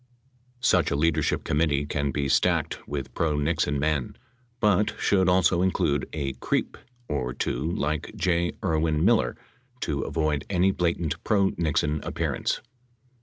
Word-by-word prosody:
Such - - +3
a - - 0
leadership 80 +1 +1
committee 75 -1 +1
can 70 0 -1
be 70 0 -1
stacked 65 - +1
with 70 -1 -5
pro 80 -3 0
Nixon 75 -1 0
men, 75 -2 -1 0.4
but 105 -2 +2
should 95 -2 +3
also 90 -1 +3
include 85 -7 +1
a 70 -3 -3
creep 65 - -2 0.3
or 65 -4 -2
two 70 +7 -2
like 75 0 -2
J. 85 -1 +1
Irwin 80 -1 +1
Miller - - +3 0.4
to 70 -3 -1
avoid 75 -3 -1
any 95 0 +3
blatant 85 -3 -1
pro 100 -2 +2
Nixon 75 -2 0
appearance. - - -2
75 Hz, 135 wpm, -26 LUFS, 70-85 Hz, 0.4 s, Such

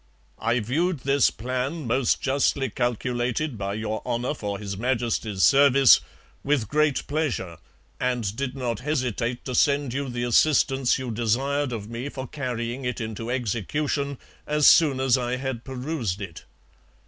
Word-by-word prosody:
I 115 +2 +1
viewed 155 - 0
this 140 0 +3
plan 130 +6 -3
most 120 +2 +1
justly 135 -1 +1
calculated 120 +3 -1
by 100 -1 -3
Your 110 0 -3
Honour 120 +3 -1
for 105 -7 -4
His 100 -1 -5
Majesty's 115 -3 -1
Service 140 -2 +7 0.4
with 140 -6 +1
great 150 +3 +1
pleasure 145 - -2 0.4
and 120 -5 -1
did 135 +1 -3
not 120 -5 -2
hesitate 125 -4 -2
to 130 - -4
send 140 -1 +2
you 140 0 -2
the 120 0 -3
assistance 135 +1 +3
you 130 -2 -4
desir'd 130 +5 0
of 110 -3 -5
me 120 +4 -5
for 130 -2 -6
carrying 125 -2 -4
it 125 0 -2
into 110 0 -5
execution, 135 +4 -2 0.3
as 150 -1 +2
soon 145 -5 +6
as 130 -1 +3
I 125 0 -1
had 130 -2 -4
perused 130 - -3
it. 90 -6 -8
125 Hz, 150 wpm, -25 LUFS, 115-140 Hz, 0.4 s, Service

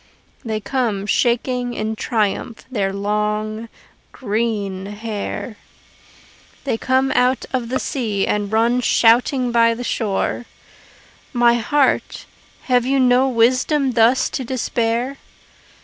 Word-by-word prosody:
They 220 -2 -2
come 215 -2 -2
shaking 245 +2 0
in 220 +1 -2
triumph 220 +1 -2
their 200 -5 -1
long, 210 +2 -2 0.4
green 205 -4 -2
hair: 210 +1 -5 1.1
They 270 - -1
come 260 +3 +1
out 250 +1 +2
of 245 -3 -2
the 260 - 0
sea 215 -9 -2
and 205 -1 -1
run 235 +3 +2
shouting 245 +2 +3
by 230 -1 +3
the 245 - -6
shore. 225 +1 -2 0.9
My 240 -1 +4
heart, 260 +4 0 0.4
have 250 -2 +2
you 270 +2 +1
no 255 +1 +4
wisdom 255 +4 +2
thus 235 +2 +3
to 265 - -3
despair? 240 +1 -1
235 Hz, 115 wpm, -20 LUFS, 215-250 Hz, 1.1 s, My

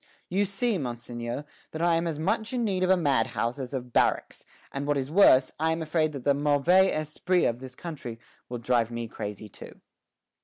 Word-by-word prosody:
"You 195 +3 +1
see, 200 +1 -1
Monseigneur, 120 +1 -5 0.2
that 160 - -6
I 170 -1 +4
am 165 +1 +1
as 160 -3 -2
much 220 +8 -1
in 245 -2 0
need 195 -4 0
of 185 - +2
a 190 - +5
madhouse 135 -4 0
as 130 -2 -5
of 125 -3 -5
barracks; - - +1 0.3
and 140 +1 -4
what 145 -1 +2
is 135 +1 -3
worse, 135 -8 +6
I 160 +1 +2
am 160 0 -1
afraid 155 0 +1
that 135 -3 -6
the 140 - +4
mauvais 150 +7 +4
esprit 155 +4 0
of 120 +1 0
this 130 -1 -10
country 130 -9 -7 0.3
will 120 - -4
drive 120 -1 +1
me 120 -1 -4
crazy 105 -1 -6
too." - - -12
145 Hz, 200 wpm, -27 LUFS, 125-175 Hz, 0.3 s, worse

